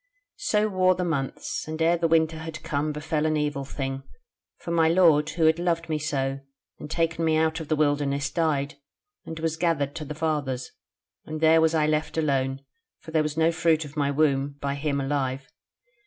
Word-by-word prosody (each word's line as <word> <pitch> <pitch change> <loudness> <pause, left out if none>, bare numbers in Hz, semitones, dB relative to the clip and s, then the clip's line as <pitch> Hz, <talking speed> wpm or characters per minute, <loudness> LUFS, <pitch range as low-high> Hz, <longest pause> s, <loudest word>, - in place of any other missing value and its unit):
"So 215 - +1
wore 185 -2 +3
the 180 0 -2
months, 140 -4 -3
and 155 0 -5
ere 165 +1 +4
the 170 -1 +1
winter 160 -1 +2
had 160 -1 -7
come 150 +1 -1
befell 150 +1 -1
an 155 0 +1
evil 145 -2 -1
thing, 135 0 -4 0.6
for 170 - -7
my 165 -1 +3
lord, 160 -4 +4
who 160 0 0
had 160 +1 +4
loved 170 -1 -1
me 155 -1 0
so, 135 -2 -2 0.4
and - - -8
taken 165 0 0
me 160 -1 +3
out 160 +1 +1
of 160 - -7
the 155 - +1
wilderness, 145 -2 0
died, 145 -4 -1 0.5
and 160 0 -6
was 160 0 -1
gathered 160 -5 0
to 155 - -5
the 150 - -6
fathers, 145 -5 -2 0.6
and 155 0 -5
there 160 +1 +5
was 160 0 +3
I 155 -1 +3
left 155 +1 -1
alone; 135 -3 0 0.3
for 160 - -11
there 160 -1 +3
was 155 0 -3
no 160 +1 +4
fruit 165 -1 +1
of 145 +1 -11
my 145 -2 +1
womb 140 -1 +1
by 140 -1 -2
him 140 0 -1
alive. 135 -1 -2
155 Hz, 200 wpm, -26 LUFS, 140-160 Hz, 0.6 s, there